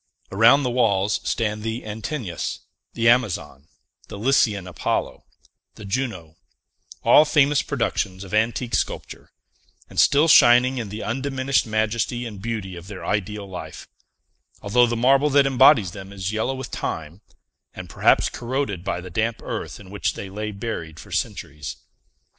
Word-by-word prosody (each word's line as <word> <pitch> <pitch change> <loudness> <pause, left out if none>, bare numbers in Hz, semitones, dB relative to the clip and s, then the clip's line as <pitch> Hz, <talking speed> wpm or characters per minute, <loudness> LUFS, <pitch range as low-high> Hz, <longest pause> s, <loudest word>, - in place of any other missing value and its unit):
Around 115 +8 +5
the 125 - -1
walls 105 -4 +1
stand 105 -2 -1
the 115 +2 -4
Antinous, 110 - -4 0.3
the 115 - +1
Amazon, 100 - +1 0.4
the - - -8
Lycian 105 -4 +2
Apollo, 90 -4 -3 0.5
the 105 - -11
Juno; 95 -8 -4 0.7
all 150 - +7
famous 145 -1 +3
productions 105 -7 -2
of 95 - -11
antique 115 +3 0
sculpture, - - -3 0.6
and - - -3
still 150 +3 +5
shining 125 -2 +6
in 110 -4 -5
the 105 +2 -6
undiminished 130 0 -1
majesty 110 +3 -1
and 105 -4 -8
beauty 110 -5 -4
of 85 +1 -10
their 95 -4 -8
ideal 105 +1 -2
life, 95 -2 -8 0.8
although 120 +4 +4
the 120 0 -2
marble 135 +5 +4
that 140 0 +4
embodies 130 - +5
them 95 +1 -10
is 95 0 -4
yellow 110 +5 -1
with 130 - -7
time, 80 +4 -5 0.5
and - - -8
perhaps - - +3
corroded 120 -7 -3
by 95 -2 -3
the 90 0 -10
damp 110 +5 -1
earth - - -5
in 95 -2 -13
which 100 -1 -2
they 95 - -7
lay 105 +2 -4
buried 100 -7 -6
for - - -13
centuries. 75 -2 -4
110 Hz, 150 wpm, -23 LUFS, 95-125 Hz, 0.8 s, all